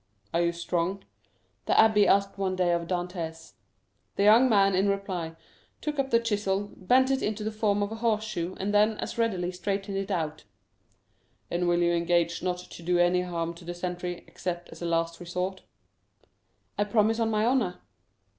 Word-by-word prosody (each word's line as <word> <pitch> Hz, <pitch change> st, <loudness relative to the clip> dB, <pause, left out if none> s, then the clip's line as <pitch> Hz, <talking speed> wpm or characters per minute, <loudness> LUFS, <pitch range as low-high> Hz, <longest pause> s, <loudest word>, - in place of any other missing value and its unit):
"Are 170 Hz, -, +2 dB
you 170 Hz, 0 st, +2 dB
strong?" 170 Hz, +3 st, -2 dB, 0.6 s
the -, -, +3 dB
abbé 215 Hz, -2 st, +5 dB
asked 195 Hz, 0 st, +3 dB
one 190 Hz, -1 st, 0 dB
day 180 Hz, -1 st, +2 dB
of 170 Hz, -1 st, -1 dB
Dantès. 175 Hz, -3 st, -4 dB, 0.6 s
The 200 Hz, -, +1 dB
young 225 Hz, +5 st, +6 dB
man, 195 Hz, -3 st, +4 dB
in 190 Hz, +2 st, +2 dB
reply, 185 Hz, -5 st, -3 dB, 0.4 s
took 300 Hz, -1 st, -3 dB
up 270 Hz, -1 st, 0 dB
the 230 Hz, -, +4 dB
chisel, 205 Hz, -3 st, -1 dB
bent 260 Hz, +7 st, +3 dB
it 270 Hz, -, +1 dB
into 210 Hz, 0 st, -2 dB
the 215 Hz, -, -2 dB
form 210 Hz, -1 st, +1 dB
of 205 Hz, -, -3 dB
a 225 Hz, -, -5 dB
horseshoe, 215 Hz, -6 st, -1 dB
and 200 Hz, +2 st, -1 dB
then 210 Hz, +1 st, +4 dB
as -, -, -5 dB
readily 185 Hz, -6 st, 0 dB
straightened 195 Hz, +2 st, -3 dB
it. 195 Hz, 0 st, -3 dB, 1.4 s
"And 175 Hz, +1 st, 0 dB
will 175 Hz, 0 st, +3 dB
you 175 Hz, 0 st, +3 dB
engage 170 Hz, 0 st, +1 dB
not 180 Hz, -1 st, -1 dB
to -, -, -10 dB
do 175 Hz, +1 st, +1 dB
any 175 Hz, +1 st, +3 dB
harm 170 Hz, -2 st, -3 dB
to 170 Hz, -, -14 dB
the 175 Hz, +1 st, -6 dB
sentry, 180 Hz, 0 st, -4 dB
except 175 Hz, -1 st, -5 dB
as -, -, -12 dB
a 170 Hz, -, -2 dB
last 165 Hz, 0 st, 0 dB
resort?" 180 Hz, +2 st, -3 dB, 1.2 s
"I -, -, +4 dB
promise 215 Hz, +2 st, +2 dB
on 225 Hz, -1 st, +1 dB
my 215 Hz, 0 st, +1 dB
honor." 235 Hz, -8 st, +1 dB
190 Hz, 180 wpm, -28 LUFS, 175-210 Hz, 1.4 s, young